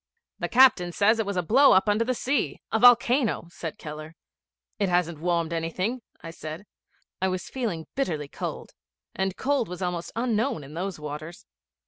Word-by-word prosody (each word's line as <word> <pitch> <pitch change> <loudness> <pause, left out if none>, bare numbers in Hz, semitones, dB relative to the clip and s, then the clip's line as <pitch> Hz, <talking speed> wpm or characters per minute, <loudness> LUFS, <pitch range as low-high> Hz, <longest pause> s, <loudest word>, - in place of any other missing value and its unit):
'The - - -2
captain 245 -9 +5
says 215 +5 +3
it 220 - -1
was 200 -2 -2
a 180 - +1
blow 265 - +6
up 190 - +4
under 210 +2 +3
the 255 +2 -1
sea 245 - -1
a 220 - +2
volcano,' 245 -2 +4
said 165 -2 -6
Keller. 155 +1 -8 0.6
'It 200 -2 +1
hasn't 175 -3 0
warmed 170 0 0
anything,' 185 +9 -2 0.2
I 165 - -7
said. 160 +3 -8 0.6
I 190 - +2
was 185 -1 -4
feeling 210 -12 -3
bitterly 160 - -2
cold, - - -6 0.4
and 190 0 -2
cold 280 -3 0
was 180 +1 -5
almost 175 -1 -3
unknown 230 - 0
in 140 +2 -11
those 180 +1 -4
waters. 150 +3 -7
185 Hz, 170 wpm, -26 LUFS, 165-230 Hz, 0.6 s, blow